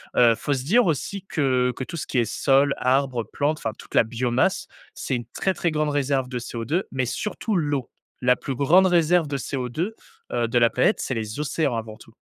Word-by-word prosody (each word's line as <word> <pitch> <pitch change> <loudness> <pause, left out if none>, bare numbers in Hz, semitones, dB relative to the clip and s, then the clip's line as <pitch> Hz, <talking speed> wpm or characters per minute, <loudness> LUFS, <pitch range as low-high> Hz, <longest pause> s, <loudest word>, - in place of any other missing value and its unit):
heu, 120 -2 +5
faut 145 +6 -2
se 130 - -2
dire 225 - +4
aussi 180 +5 -2
que 130 -5 +1
que - - -4
tout 170 - -7
ce - - -4
qui 130 - 0
est 120 - +2
sol, 140 +5 +2
arbres, 130 -2 +1
plantes, 145 +8 -1
enfin 110 - -3
toute - - -11
la - - +6
biomasse, 125 - 0 0.3
c'est 130 - -3
une 120 - -4
très, 190 -2 0
très 170 -2 0
grande 155 0 0
réserve 140 -2 0
de 125 - -4
CO2, 125 +9 -2
mais 130 -1 -1
surtout 210 - -3
l'eau. 145 -7 -1 0.3
La 125 0 +4
plus 135 0 -5
grande 170 +8 +5
réserve 175 -2 +3
de 140 - -3
CO2, 135 - -3 0.4
heu, 120 -1 0
de 120 +1 +2
la 115 - +5
planète, 210 - +2
c'est 130 - -2
les 110 +2 -4
océans 150 -3 0
avant 110 -1 -5
tout. 115 - -17
135 Hz, 215 wpm, -24 LUFS, 120-155 Hz, 0.4 s, la